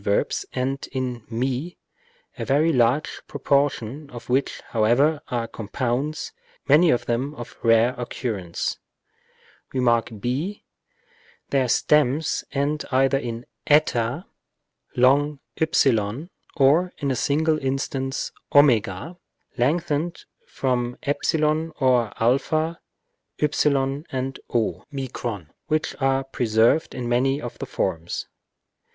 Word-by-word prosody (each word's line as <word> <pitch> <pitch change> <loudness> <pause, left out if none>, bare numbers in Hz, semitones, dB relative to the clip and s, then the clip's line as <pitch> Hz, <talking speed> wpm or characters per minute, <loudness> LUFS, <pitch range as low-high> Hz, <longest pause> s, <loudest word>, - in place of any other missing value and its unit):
verbs 100 0 0
end 135 +2 -2
in 125 -3 -3
ju, 130 +8 -2 0.6
a - - -4
very 155 +4 +3
large 125 +4 +1
proportion 140 -1 0
of 120 -2 -10
which, 130 +2 +1
however, 125 +8 +3
are 120 -2 -2
compounds, 125 +7 -3 0.4
many 155 +5 +6
of 120 - +2
them 130 +5 -1
of 120 -4 -9
rare 115 +1 +4
occurrence. 110 -8 -3 0.9
Rem. 130 -1 -1
ὃ. 120 - 0 0.9
Their 135 -2 +2
stems 150 +3 +2
end 145 +2 -1
either 135 +1 +3
in 120 -2 -5 0.2
ἡ, 145 0 +2 0.7
ὕ, 135 - +2 0.3
or 155 +6 +4
(in 140 -1 -1
a - - 0
single 155 +5 +1
instance) 135 0 -2 0.2
w, 125 - +3 0.4
lengthened 155 +5 0 0.2
from 125 -2 -1
ε 140 - +1 0.7
or 125 -5 +3
ἃ, 155 +7 +1 0.6
ὕ 140 -1 +1
and 130 0 -3
o, 115 -3 0 0.8
which 155 0 0
are 135 0 +2
preserved 120 +3 +2
in 125 -2 -3
many 130 +3 +2
of 120 -4 -7
the - - -5
forms. 80 +1 -2
135 Hz, 105 wpm, -24 LUFS, 120-145 Hz, 0.9 s, many